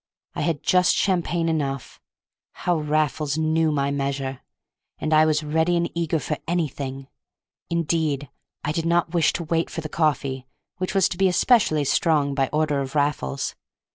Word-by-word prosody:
I - - -4
had 165 -2 +1
had 145 - -24
just 180 -1 +4
champagne 175 -3 +1
enough—how 155 +3 -4
Raffles 150 -1 0
knew 160 0 +2
my 140 -1 0
measure!—and 140 +2 -5
I 155 0 +6
was 155 0 +1
ready 160 +3 +1
and 170 0 -1
eager 165 -1 0
for 150 0 -3
anything. 140 -5 -3 0.6
Indeed, 160 -4 0 0.4
I 145 - -1
did 165 +1 -1
not 170 0 +1
wish 165 -3 +3
to 170 - -3
wait 165 +1 0
for 165 - -5
the 155 - -6
coffee, 135 -4 -1 0.3
which 185 +2 -3
was 195 -2 +5
to 175 - -5
be 195 - +5
especially 180 - +3
strong 145 0 +2
by 135 -1 0
order 150 -2 +1
of 135 +1 -6
Raffles. 145 -1 -1
155 Hz, 160 wpm, -24 LUFS, 140-170 Hz, 0.6 s, I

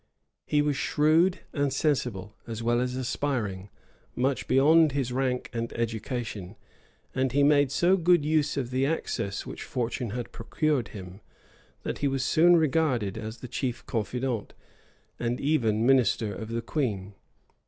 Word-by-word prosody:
He 150 0 +2
was 145 -1 0
shrewd 160 +7 +2
and 145 -2 0
sensible, 125 -9 -1
as 115 -1 -5
well 120 +1 +2
as 125 0 -2
aspiring, 120 -7 -2 0.5
much 130 +2 0
beyond 150 +3 +5
his 135 -3 -1
rank 130 -1 -1
and 115 0 -3
education; 115 -3 -4 0.6
and 130 -2 0
he 140 +1 +4
made 145 -2 +4
so 175 +6 +3
good 175 -3 +3
use 150 -2 +1
of 130 -3 -2
the 130 +1 +1
access 135 -9 -2
which - - -8
fortune 125 0 -3
had 120 +3 -5
procured 135 +3 -1
him, 95 -1 -10 0.6
that - - -4
he 145 - +1
was 135 -1 -1
soon 175 +2 +5
regarded 140 - +1
as 110 +1 -7
the 125 - -6
chief 125 0 -3
confidant, 120 +1 -3 0.6
and 120 +1 -1
even 115 -7 +1
minister 120 -5 +3
of 110 +4 -7
the 115 0 -3
queen. 105 -9 -2
125 Hz, 150 wpm, -27 LUFS, 115-145 Hz, 0.6 s, beyond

